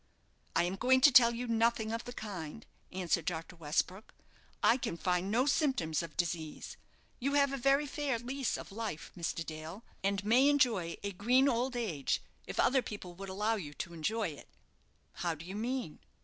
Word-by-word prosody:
"I 165 - +4
am 180 +2 -2
going 260 +4 +4
to 290 - +8
tell 235 -2 +8
you 245 +1 -3
nothing 230 -1 +1
of 230 +1 -3
the 245 - -6
kind," 200 -3 -6 0.3
answered 180 -3 0
Dr. 165 0 -4
Westbrook. 175 +5 -2 0.5
"I 235 - +6
can 235 -9 -3
find 180 +2 0
no 240 +5 +3
symptoms 260 - +1
of 165 -2 -8
disease. 165 -3 -3 0.4
You 275 +3 0
have 280 -1 +4
a - - -1
very 275 +3 +3
fair 290 -3 -1
lease 255 +2 -2
of - - -9
life, 210 -6 -5
Mr. 170 -1 -3
Dale, 160 +7 -7 0.2
and 200 0 0
may 250 +6 +5
enjoy 230 - +2
a 200 - -2
green 245 +8 +3
old 250 0 +1
age, 180 - -1 0.3
if - - -5
other 265 0 +4
people 200 -6 -7
would 195 +2 -8
allow 210 +4 0
you 145 -7 -7
to 170 - -5
enjoy 210 +6 -1
it." 145 - -11 0.7
"How 170 -2 -1
do 155 +2 -10
you 190 +2 -6
mean?" 240 - -3
210 Hz, 185 wpm, -33 LUFS, 170-250 Hz, 0.7 s, to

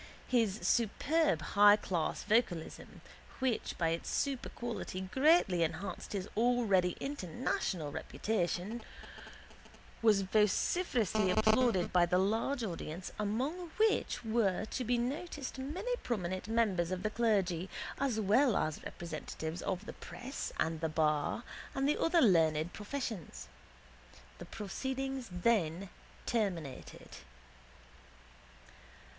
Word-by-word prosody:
His 225 -5 +2
superb 240 - +2
highclass 205 -5 +4
vocalism, 205 -7 -1 0.4
which 255 -4 -1
by 165 -2 +1
its 165 +1 -2
superquality 240 -8 -3
greatly 265 - +4
enhanced 165 +7 -3
his 195 -1 -3
already 220 -7 +2
international 190 - -2
reputation, 205 +5 -2 1.2
was 210 -3 +4
vociferously 215 - +2
applauded 220 0 +3
by 175 -1 +5
the 180 - +2
large 225 +7 +1
audience 175 -2 -5
among 265 - -2
which 430 - +1
were 220 -3 +1
to 255 - -2
be 245 +1 +1
noticed 275 +2 -3
many 370 - -2
prominent 185 - -3
members 210 -7 +1
of 185 0 -3
the 215 - 0
clergy 195 -6 +1 0.3
as 260 -5 0
well 220 +5 +4
as 155 -1 -2
representatives 160 0 -6
of 190 +2 -3
the - - -7
press 265 +3 -6
and 160 0 0
the 160 - 0
bar 155 +6 +1 0.3
and 270 0 +1
the 295 - +1
other 335 0 +4
learned 160 - +3
professions. 220 - -5 0.9
The - - -7
proceedings 265 +4 -4
then 180 -2 +1 0.4
terminated. 180 - -3
210 Hz, 105 wpm, -33 LUFS, 180-245 Hz, 1.2 s, by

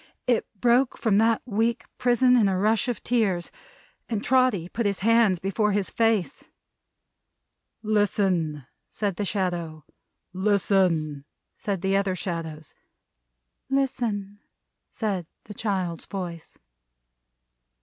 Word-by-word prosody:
It 245 -2 +1
broke 245 +3 +3
from 210 -3 +2
that 225 0 +2
weak 230 0 0
prison 250 +1 +4
in 225 -5 +4
a 190 -1 +1
rush 215 +6 +2
of 245 - -3
tears; 205 -8 0 0.6
and 220 -3 -2
Trotty 255 -9 +2
put 225 +3 -1
his 200 -2 -2
hands 225 -3 +4
before 200 +3 0
his 200 -1 -1
face. 225 -1 +1 1.4
"Listen!" 190 - +1 0.2
said 200 -4 -3
the 205 - -1
Shadow. 175 -6 -2 0.5
"Listen!" 185 -7 +1 0.3
said 195 -4 -3
the 195 0 +2
other 195 -1 +1
Shadows. 160 -4 -5 1.0
"Listen!" 230 -7 -1 0.5
said 195 -7 -3 0.2
the 210 - -10
child's 190 -6 -3
voice. 175 -4 -7
200 Hz, 110 wpm, -25 LUFS, 180-225 Hz, 1.4 s, prison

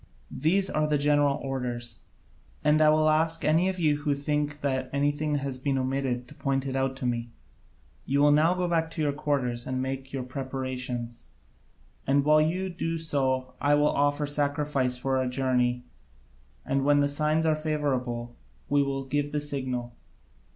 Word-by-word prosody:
These 185 +7 +2
are 155 0 +1
the 150 -1 +2
general 145 -1 +3
orders: 125 -3 -3 0.6
and 150 +1 +4
I 155 - +6
will 155 0 +4
ask 160 +1 +2
any 165 +5 +3
of 190 - -3
you 155 -4 +2
who 145 -1 0
think 150 +1 -2
that 130 -2 -1
anything 145 +2 0
has 140 -2 -2
been 135 0 0
omitted 130 -1 -1
to - - -12
point 135 -1 -1
it 135 -1 -3
out 135 0 0
to 135 -1 -5
me. 120 -1 -1 0.8
You 140 +1 +2
will 145 - +6
now 160 +4 +4
go 180 -1 -1
back 165 -1 +1
to 165 - -5
your 145 -1 +1
quarters 135 -5 -1
and 130 0 -2
make 135 +1 -4
your 135 -2 -3
preparations, 125 -2 -5 0.8
and 140 +1 +3
while 155 0 +5
you 180 +5 0
do 165 -2 -3
so 130 -5 -1
I 145 +1 +4
will 145 0 +3
offer 145 +1 +1
sacrifice 145 -3 0
for 130 +1 0
our 130 - 0
journey 125 -1 0 0.8
and 135 0 0
when 145 +1 +4
the 145 - +3
signs 155 +2 +1
are 155 -1 +3
favourable 130 -6 -2 0.3
we 145 0 +3
will 135 -1 -2
give 145 +2 -1
the 150 - 0
signal. 130 -4 -3
140 Hz, 175 wpm, -27 LUFS, 130-150 Hz, 0.8 s, I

